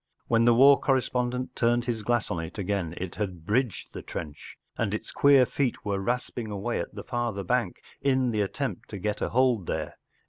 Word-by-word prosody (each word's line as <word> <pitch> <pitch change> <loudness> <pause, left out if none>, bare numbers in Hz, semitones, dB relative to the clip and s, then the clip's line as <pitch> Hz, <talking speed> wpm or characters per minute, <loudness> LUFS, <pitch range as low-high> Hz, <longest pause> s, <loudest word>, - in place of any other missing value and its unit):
When 115 0 +3
the 120 -1 +6
war 135 +3 +7
corre 135 -1 +3
spondent 125 0 -2
turned 120 0 +1
his 120 -3 -2
glass 120 +1 0
on 85 - -1
it 80 +4 -6
again 95 -4 -2
it 90 -1 -4
had 90 -6 -4
bridged 115 +1 -1
the - - -6
trench, 75 -4 -8 0.2
and 105 -2 -1
its - - -6
queer 140 -2 +6
feet 130 -3 -2
were 100 -1 0
rasping 120 +1 -2
away 105 +3 -2
at - - -5
the - - -6
farther 120 -5 -2
bank, - - -1 0.2
sn 130 -3 +2
the 105 -2 0
attempt 100 - -3
to - - -6
get 105 +2 -2
a - - 0
hold 125 -7 +2
there. - - -3
115 Hz, 205 wpm, -27 LUFS, 100-125 Hz, 0.2 s, war